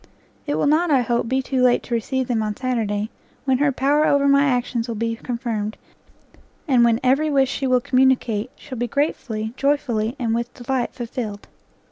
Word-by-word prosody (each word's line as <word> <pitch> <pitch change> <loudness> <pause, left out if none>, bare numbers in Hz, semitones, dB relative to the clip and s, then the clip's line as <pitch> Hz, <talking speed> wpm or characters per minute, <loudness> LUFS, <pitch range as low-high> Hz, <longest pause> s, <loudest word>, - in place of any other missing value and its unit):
It 290 - 0
will - - +1
not, 315 +4 +3
I 275 -4 +4
hope, 235 -1 0
be 265 +1 +1
too 260 -1 -1
late 250 -1 +3
to 240 - -6
receive 255 +3 -1
them 230 -3 0
on 210 -1 -2
Saturday, 220 -4 -2 0.3
when 260 -2 +2
her 290 0 +3
power 285 +4 +2
over 280 0 +3
my 280 0 +5
actions 245 -3 0
will 230 - -4
be 230 +1 -1
confirmed, 230 -4 -3 0.9
and 255 -5 +4
when 230 -1 +3
every 275 +5 +3
wish 270 -2 +2
she 270 - -2
will 255 -1 +3
communicate, 255 -4 +2
shall 260 -5 -9
be 245 - 0
gratefully, 230 -5 -2
joyfully, 250 -5 0
and 230 -3 -1
with 235 +1 -2
delight 250 0 -2
fulfilled. 230 -4 -5
250 Hz, 185 wpm, -22 LUFS, 230-270 Hz, 0.9 s, my